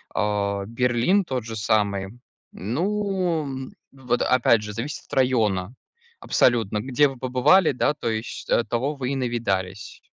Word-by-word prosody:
э, 100 -1 0
Берлин 125 - +2
тот 130 -8 -3
же 115 -1 -6
самый. 100 -2 0 0.4
Ну, 165 - -2 0.2
вот 125 -3 -2
опять 120 -3 +3
же, 105 0 -6
зависит 130 +7 -5
от - - -14
района. 110 -7 +1 0.5
Абсолютно, 110 -4 +2
где 135 +5 +2
вы 135 -1 -8
побывали, 130 +9 +3
да. 140 +2 +1
То 145 - -4
есть, 110 +1 -5
э, - - +3
того 130 +6 -2
вы 130 -2 -3
и - - -1
навидались. 115 -8 -3
120 Hz, 140 wpm, -24 LUFS, 105-135 Hz, 0.5 s, опять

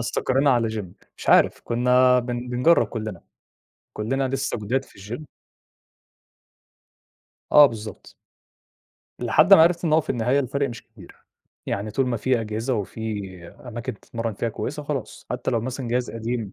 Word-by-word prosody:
استقرينا 135 +4 +1
على 120 -3 +2
gym 110 -3 -4 0.3
مش - - -9
عارف - - +5
كنّا 125 +1 +4
بن 125 0 -4
بنجرّب 125 +8 +3
كُلّنا، 110 -6 -6 0.7
كُلّنا 130 +5 -1
لسه 135 -1 -2
جداد 130 +6 -1
في - - -20
الgym. 115 +10 -7 2.3
آه 150 -1 +9
بالضبط. 110 -4 -8 1.0
لحد 125 - +6
ما 160 - +7
عرفت 170 +1 +3
إن 155 - +1
هو 160 - +5
في - - -6
النهاية 125 +3 +1
الفرق 140 +1 -1
مش 120 -2 -8
كبير، 110 -6 -16 0.5
يعني 105 +2 -3
طول 130 +4 0
ما 120 -2 -1
في 125 +2 +1
أجهزة 115 +4 -2
وفي 110 0 -4 0.3
أماكن 120 0 -7
تتمرن 115 -1 -4
فيها 115 +3 -2
كويسة 145 +6 -5
خلاص 145 -4 -5
حتى 125 +1 -2
لو 115 -2 +1
مثلًا 130 +1 -5
جهاز 125 +1 -1
قديم. 115 -2 -4
120 Hz, 155 wpm, -23 LUFS, 110-135 Hz, 2.3 s, آه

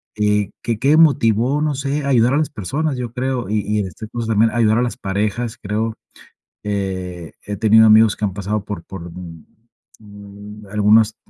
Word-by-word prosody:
Y, 105 -1 +1
que, 115 -2 -2
¿qué 145 +4 +3
motivo? 135 -3 +3
No 150 -2 0
sé. 140 +2 -2
A - - -2
ayudar 125 -1 +3
a - - +2
las 155 - 0
personas, 140 - -3
yo 120 -2 -5
creo. 125 -3 -2
Y 105 0 0
y 105 0 0
este 95 +3 -7
curso, 115 0 -5
también 110 +1 +3
ayudar 115 -1 +2
a - - +1
las 125 0 -2
parejas, 105 +3 -2
creo. 110 +2 -2 0.7
Eh, 95 -5 -4
he 105 - -4
tenido 110 +1 +5
amigos 110 0 +6
que 105 - -1
han 95 - -3
pasado 100 +1 -3
por 95 -5 -6
por, 85 -2 -9
mm 85 -2 -10 0.5
mm, 100 0 -12
algunas, 105 +2 +3
110 Hz, 185 wpm, -19 LUFS, 100-120 Hz, 0.7 s, amigos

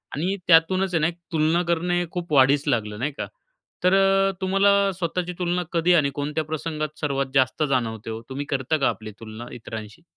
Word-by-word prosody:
आणि 180 +7 -1
त्यातूनच 180 +3 +4
आहे 165 - +3
ना, 155 - +3 0.2
तुलना 160 +1 +2
करणे 175 +1 +1
खूप 175 -3 -5
वाढीस 140 +1 +5
लागलं 105 -5 -1
नाही 145 +5 -1
का? - - -3 0.6
तर 185 +1 +5
अ, 195 0 +4
तुम्हाला 195 +1 +3 0.2
स्वतःची 180 0 -3
तुलना 180 0 0
कधी 170 +1 +3
आणि 145 -4 +3
कोणत्या 150 +2 -2
प्रसंगात 155 0 -4
सर्वात 140 -2 0
जास्त 130 +2 +2
जाणवते 115 -4 -1
हो? 110 - -5
तुम्ही 140 +2 -4
करता 135 +3 0
का 135 - +2
आपली 110 -1 -5
तुलना 110 +1 -8
इतरांशी? 110 +3 -8
155 Hz, 175 wpm, -24 LUFS, 135-175 Hz, 0.6 s, वाढीस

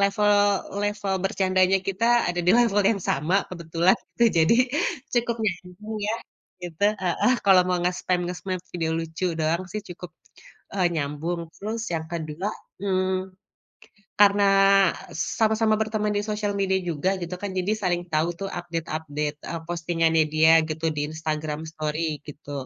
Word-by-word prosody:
level 205 +1 +3 0.5
level 205 -1 -1
bercandanya 190 0 +2
kita 195 +4 -1 0.3
ada 175 - -2
di 180 - +6
level 215 -4 +3
yang 225 - +1
sama 155 +7 +1
kebetulan 170 +1 +1 0.2
gitu. 235 - +4 0.2
Jadi 160 +8 +5 0.6
cukup 235 -1 +1
nyambung 185 +3 -4
ya, 220 - +1 0.5
gitu, 175 +2 -3 0.2
heeh, 185 +8 +2
kalau 190 -2 +7
mau 180 - +2
ngespam-ngespam 180 +1 -1 0.2
video 165 -2 -1
lucu 165 +2 -3
doang 165 +3 0
sih 215 - -3
cukup, 180 0 -8 0.7
eee, 185 -3 +3
nyambung. 155 +3 -2
Terus 220 +3 -4
yang 160 -1 -2
kedua, 165 +3 -3 0.3
mmm, 185 -1 -1 0.9
karena 200 0 +6 0.9
sama-sama 220 0 +3
berteman 215 -1 -1
di 205 - 0
sosial 210 -1 -2
media 195 -1 +1
juga 180 +5 0
gitu 175 +1 -4
kan, 205 - -3
jadi 185 +3 0
saling 180 -5 -1
tahu 155 +1 +2 0.2
tuh - - -4
update-update, 155 -3 -4
eee, 165 - -3
postingannya 165 -1 +1
dia 160 +1 +6 0.2
gitu 160 +1 -3
di 145 0 -2
Instagram 155 -1 -3
story 155 -1 -3
gitu. 145 0 -10
180 Hz, 140 wpm, -25 LUFS, 160-200 Hz, 0.9 s, kalau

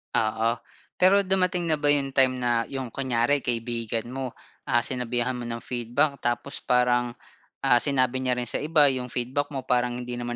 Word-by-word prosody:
Oo, 115 +2 +1 0.4
pero 195 +2 +5
dumating 185 -3 0
na 155 - +2
ba 145 - 0
yung 140 -2 +2
time 130 -1 +3
na 120 -2 0
yung 130 -3 -5
kunyari 130 +1 +1
kaibigan 115 -1 -2
mo, 130 -2 -5 0.3
ah, 120 -1 +2
sinabihan 125 -1 -1
mo 120 -1 -5
ng 115 0 -5
feedback. 125 +4 -1
Tapos 120 +3 -2
parang, 120 -1 +1 0.5
ah, 125 -3 +6
sinabi 130 -2 +1
niya 125 -1 0
rin 125 - -2
sa - - 0
iba 150 -2 +4
yung 125 -1 -4
feedback 130 +4 -2
mo, 135 -3 -5
parang 125 -1 +1
hindi 120 0 -5
naman 120 0 -4
125 Hz, 180 wpm, -25 LUFS, 120-140 Hz, 0.5 s, ah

